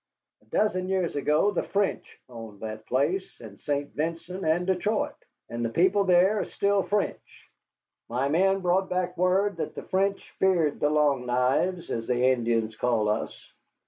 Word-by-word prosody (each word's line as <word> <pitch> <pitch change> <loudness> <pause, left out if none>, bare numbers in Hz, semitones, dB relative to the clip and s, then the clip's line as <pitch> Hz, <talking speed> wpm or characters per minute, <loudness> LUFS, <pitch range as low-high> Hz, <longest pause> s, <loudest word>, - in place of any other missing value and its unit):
A - - -27
dozen 185 -4 0
years 185 -4 0
ago 150 +7 +2
the - - -1
French 200 0 -2
owned 115 -4 -10
that 110 0 -7
place, 145 +9 -1
and 105 -4 -12
St. 145 0 -2
Vincent, 170 +4 -4
and 165 +3 +1
Detroit, 190 +4 0 0.3
and 120 0 -4
the 115 - 0
people 190 - +2
there 185 +3 +4
are - - -1
still 200 0 +1
French. 200 +2 -3 0.6
My 125 +4 0
men 190 +6 +2
brought 185 +1 +1
back 180 0 -1
word 185 +2 +1
that - - -4
the - - -6
French 195 +1 -1
feared 175 -6 +2
the 145 - +2
Long 145 -4 +2
Knives, 135 +9 0
as 115 -1 -3
the 125 0 +1
Indians 115 -3 0
call 110 -3 +1
us. 105 - -4
170 Hz, 165 wpm, -27 LUFS, 125-190 Hz, 0.6 s, there